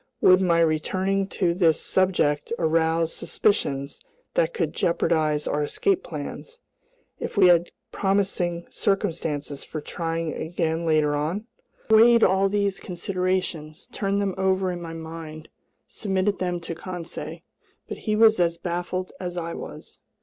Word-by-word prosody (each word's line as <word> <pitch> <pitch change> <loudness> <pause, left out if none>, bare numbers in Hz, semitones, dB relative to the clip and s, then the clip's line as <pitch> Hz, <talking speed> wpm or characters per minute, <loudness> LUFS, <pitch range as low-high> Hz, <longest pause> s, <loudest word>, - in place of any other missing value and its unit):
Would 185 0 +6
my 170 -3 +3
returning 185 +5 +1
to 180 -3 0
this 170 -4 +3
subject 175 -5 +1
arouse 165 0 +1
suspicions 140 -9 -1 0.3
that - - +2
could 470 - -2
jeopardize 155 -3 +1
our 150 - 0
escape 380 - +1
plans, 470 +4 -7 0.6
if - - -5
we 195 - +7
had 175 0 +4 0.2
promising 190 -3 0
circumstances 160 -8 -1
for 155 - -6
trying 165 +1 -3
again 165 0 -2
later 155 -2 +3
on? 160 +9 -2 0.5
I - - +6
weighed 230 +1 +7
all 190 +1 +4
these 200 -1 0
considerations, 180 -3 -3
turned 200 -3 -1
them 200 -2 0
over 190 -1 +1
in 175 -1 -5
my 165 -1 -6
mind, 160 -1 -8 0.4
submitted 195 -1 -1
them 180 -1 -1
to 170 - -5
Conseil, 175 0 -7 0.5
but - - -6
he 215 -2 -1
was 220 -2 +5
as 170 -1 +2
baffled 175 +1 -3
as 180 -1 -5
I 170 -1 -3
was. - - -9
175 Hz, 140 wpm, -25 LUFS, 160-195 Hz, 0.6 s, we